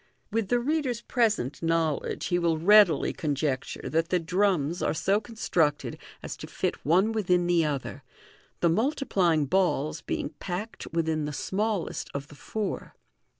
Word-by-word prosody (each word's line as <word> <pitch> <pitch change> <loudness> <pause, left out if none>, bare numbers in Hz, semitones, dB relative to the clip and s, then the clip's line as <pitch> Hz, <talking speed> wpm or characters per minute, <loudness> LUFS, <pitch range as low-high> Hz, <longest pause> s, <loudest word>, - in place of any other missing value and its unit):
With 225 -2 0
the 245 - +2
reader's 260 -3 -1
present 215 - 0
knowledge, 165 -3 0
he 175 -1 +1
will 170 -2 +1
readily 190 -1 +5
conjecture 145 -3 -2
that 165 +1 0
the 180 - +3
drums 175 -2 +1
are - - 0
so 195 +6 +2
constructed 170 -10 -1 0.2
as - - -5
to - - -8
fit - - -3
one 185 +8 +3
within 180 -5 +1
the 175 -1 +3
other, 145 -3 -3 0.6
the 170 - +4
multiplying 190 - +2
balls 155 -2 +1
being - - -3
packed 195 +5 -5
within 160 -2 0
the 150 - -3
smallest 200 +5 -2
of 140 0 -5
the 145 - -13
four. 210 +7 -4
175 Hz, 150 wpm, -27 LUFS, 155-210 Hz, 0.6 s, readily